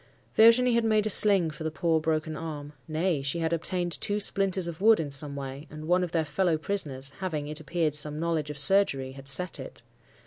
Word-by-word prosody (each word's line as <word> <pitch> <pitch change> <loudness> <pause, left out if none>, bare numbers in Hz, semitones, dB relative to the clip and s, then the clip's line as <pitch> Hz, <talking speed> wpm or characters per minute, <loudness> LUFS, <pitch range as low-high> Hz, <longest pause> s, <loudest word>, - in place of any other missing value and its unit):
"Virginie 230 +3 +5
had 235 0 +2
made 215 -1 +2
a 215 - +1
sling 195 -6 +4
for 155 - -9
the 160 - -1
poor 160 0 0
broken 155 0 -2
arm; 150 -2 -7
nay, 160 -1 -1
she 140 +4 -2
had 165 0 -1
obtained 175 +1 -1
two 205 0 0
splinters 195 -2 +1
of 170 0 -6
wood 220 +1 +5
in 150 -3 -3
some 140 +1 -1
way, 140 +2 -7
and 155 0 -9
one 180 +1 +2
of 175 - -4
their 165 -2 0
fellow 175 0 0
prisoners—having, 150 -2 -4
it 150 +1 -3
appeared, 155 -1 -1
some 150 0 -1
knowledge 160 -2 -1
of 150 - -6
surgery—had 135 -5 0
set 175 +7 0
it. - - -10
160 Hz, 205 wpm, -27 LUFS, 150-190 Hz, -, Virginie